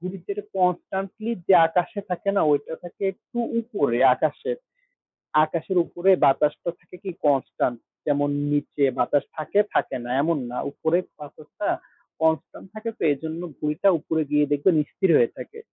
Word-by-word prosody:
ঘুড়ি 185 +2 -6
যেটা 200 0 -4
কন্সট্যান্টলি 190 +4 -1
যে 195 - +6
আকাশে 180 +4 -1
থাকে 180 +3 -1
না, - - +4
ওইটা 145 +2 0
থাকে 175 +3 -11
একটু 240 +5 -10 0.2
উপরে 145 - 0 0.2
আকাশের। 160 - -2 0.9
আকাশের 170 +4 -3
উপরে 180 +3 0 0.2
বাতাসটা 150 +4 +2
থাকে 180 0 -15
কি 190 - -4
কন্সট্যান্ট। 135 -3 +1 0.3
যেমন 145 -1 +1 0.2
নিচে 145 0 0 0.2
বাতাস 140 +4 +2
থাকে, 155 +6 0
থাকে - - 0
না, 120 - -6
এমন 165 +2 +1
না। 125 - -5
উপরে 160 +4 +1 0.2
বাতাসটা 150 +6 -7 0.5
কন্সট্যান্ট 160 +3 0
থাকে 220 +1 -4
তো, - - -20
এইজন্য 160 +4 -4 0.2
ঘুড়িটা 155 +6 +2
উপরে 160 +1 -1
গিয়ে 150 0 +4
দেখবেন 145 +5 +3 0.2
স্থির 190 - 0
হয়ে 120 - +2
থাকে। 450 - -9
160 Hz, 150 wpm, -24 LUFS, 145-190 Hz, 0.9 s, যে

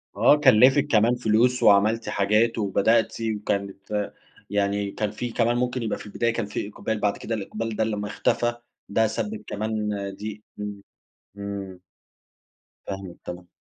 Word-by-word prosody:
آه 115 +8 +6
كلّفِك 135 +1 +5
كمان 115 0 +4
فلوس 120 +2 +2
وعملتِ 105 +2 +4
حاجات 105 +3 +2
وبدأتِ 110 +2 +2
وكانت 105 -1 -2 0.4
يعني 100 0 0
كان 105 0 -2
في 120 +3 -4
كمان 120 +1 +1
ممكن 125 0 -1
يبقى 110 - -1
في - - -10
البداية 115 +2 0
كان 115 -2 -2
في 100 0 -4
إقبال 110 +1 -3
بعد 105 -1 +1
كده 115 - -3
الإقبال 110 +2 -4
ده 110 - +1
لمّا 105 -2 -2
اختفى 120 +3 0 0.4
ده 110 +2 +3
سبِب 110 -1 -4
كمان 110 0 -2 0.3
دي 105 0 -6 0.2
إمم، 105 -1 -5 0.6
إمم. 100 -2 -6 1.1
فاهمِك، 95 -2 -6
تمام. 90 0 -7
105 Hz, 145 wpm, -25 LUFS, 100-115 Hz, 1.1 s, آه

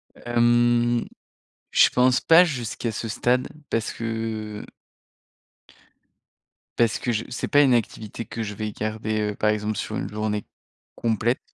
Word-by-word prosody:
Hem, 120 0 +2 0.6
je - - +6
pense 125 0 +3
pas, 165 +2 +7
jusqu'à 120 -5 -3
ce 115 - -4
stade, 125 +3 +1 0.2
parce 115 -1 -1
que 110 -2 -4 2.1
parce 115 -2 +3
que 120 - -1
je 110 0 -1
c'est - - -3
pas 145 -1 +5
une 135 -3 +4
activité 115 0 -3
que 115 - -6
je 105 -1 -5
vais 105 0 -4
garder, 110 0 -2
heu, - - -8
par 105 - +1
exemple 105 0 -2
sur - - -4
une 95 - -3
journée 105 0 -2 0.5
complète. 115 +2 0
115 Hz, 140 wpm, -24 LUFS, 110-120 Hz, 2.1 s, pas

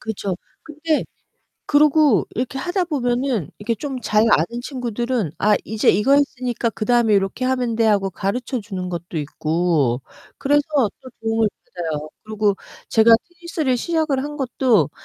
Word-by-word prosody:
그렇죠. 200 -4 -3 0.3
근데 310 0 -1 0.6
그러고 295 - +4
이렇게 255 +3 -3
하다 355 +5 -1
보면은 245 - -1
이렇게 230 +3 -2
좀 265 +4 -5
잘 215 0 +3
아는 235 +10 +2
친구들은 240 - -2
"아, 210 0 +3
이제 220 0 +2
이거 210 +9 +3
했으니까 255 -4 +1
그다음에 230 +1 +2
요렇게 195 +5 0
하면 250 -3 0
돼." 225 0 +2
하고 200 -3 +2
가르쳐 240 +7 -3
주는 190 -4 -5
것도 175 -1 -5
있고 150 -3 0 0.4
그래서 290 +1 +3 0.4
또 260 - -11
도움을 225 -1 +1 0.2
받아요. 155 -3 -5
그리고 215 -2 0 0.3
제가 225 +1 +5 0.2
테니스를 340 -6 -2
시작을 310 -3 0
한 295 +1 -6
것도 255 - +2
235 Hz, 325 characters per minute, -21 LUFS, 200-270 Hz, 0.6 s, 제가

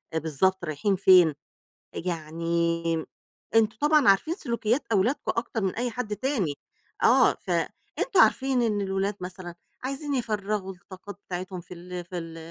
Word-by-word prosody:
بالضبط 165 +4 +1
رايحين 160 +6 0
فين، 180 -4 +6 0.6
يعني 170 0 -1 0.6
أنتم 220 -1 +3
طبعًا 300 -2 +4
عارفين 195 +12 +3
سلوكيات 235 - -1
أولادكم 225 +7 +1
أكتر 230 -1 -2
من 190 -2 -1
أي 245 +1 -1
حد 220 -2 -3
تاني، 215 - -1 0.5
آه - - +6
فأنتم 390 - -2
عارفين 265 -2 +3
إن 215 -3 +1
الولاد 195 +1 -1
مثلًا 180 -1 -7 0.3
عايزين 275 +2 -3
يفرّغوا 210 -5 -2
الطاقات 185 +2 -12
بتاعتهم 185 0 -5
في 180 - -11
ال 180 0 -7
في 180 +1 -6
ال 165 -1 -7
195 Hz, 135 wpm, -26 LUFS, 175-230 Hz, 0.6 s, فين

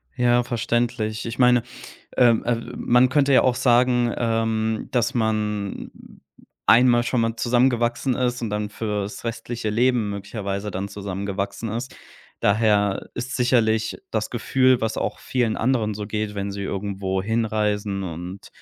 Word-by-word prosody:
Ja, 120 0 +3
verständlich. 115 -2 -1
Ich 115 +1 -6
meine, 125 -1 +5 0.5
ähm, 120 -3 +4
äh, 120 - +2 0.2
man 125 +1 +3
könnte 140 0 +3
ja - - +6
auch 130 - +3
sagen, 120 -1 +3
ähm, 115 -1 -1
dass 120 0 +1
man 105 -3 -1 0.8
einmal 120 0 +6
schon 120 0 0
mal 115 0 0
zusammengewachsen 120 +1 +1
ist 125 -1 -1
und 115 - -2
dann 105 0 -2
für's 105 -1 -4
restliche 115 0 -4
Leben 120 0 +2
möglicherweise 100 0 -4
dann 95 +1 -4
zusammengewachsen 100 +2 -4
ist. 120 +5 -5 0.5
Daher 105 -2 +2
ist 130 +4 -4
sicherlich 110 -3 +1
das 110 -1 -2
Gefühl, 130 +1 +2
was 110 0 -1
auch - - -2
vielen 120 -4 -1
anderen 115 -3 +1
so 105 0 -5
geht, 105 0 -3
wenn 100 0 -3
sie 100 0 -5
irgendwohin 100 +2 -2
reisen 105 -2 -1
und 90 +2 -7
110 Hz, 140 wpm, -23 LUFS, 105-120 Hz, 0.8 s, ja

